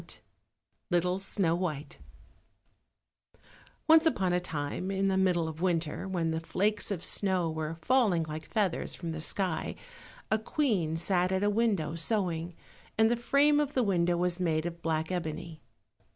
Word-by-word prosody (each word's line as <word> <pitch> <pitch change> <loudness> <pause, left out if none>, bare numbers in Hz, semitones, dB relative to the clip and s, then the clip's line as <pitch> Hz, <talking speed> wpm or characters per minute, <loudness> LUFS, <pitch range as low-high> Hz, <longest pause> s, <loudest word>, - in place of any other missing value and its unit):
53 - - -10 0.7
Little 180 +1 +1
Snow 195 -3 0
white 155 -5 -3 1.9
Once 320 +1 +7
upon 190 - +1
a 180 - +3
time 165 +1 -4
in 195 0 +1
the 190 - +1
middle 180 -3 +2
of 160 +1 -7
winter, 170 -1 -1
when 170 -4 -1
the 160 - -1
flakes 205 +5 0
of 190 -5 -3
snow 185 -5 +1
were 160 0 -4
falling 225 -10 +3
like 155 0 -7
feathers 205 -6 -1
from 170 -2 -5
the 160 0 -5
sky, 180 0 -1 0.6
a 220 - +3
queen 210 - 0
sat 180 +1 +1
at 190 +1 0
a 205 - +3
window 200 -8 +1
sewing, 170 -1 -1 0.4
and 220 +1 +4
the - - +3
frame 280 +5 +3
of 290 -1 -1
the 255 - +3
window 175 -4 +2
was 180 0 0
made 160 -3 0
of 170 0 -5
black 160 0 -1
ebony. 160 -2 -4
180 Hz, 160 wpm, -30 LUFS, 165-200 Hz, 1.9 s, Once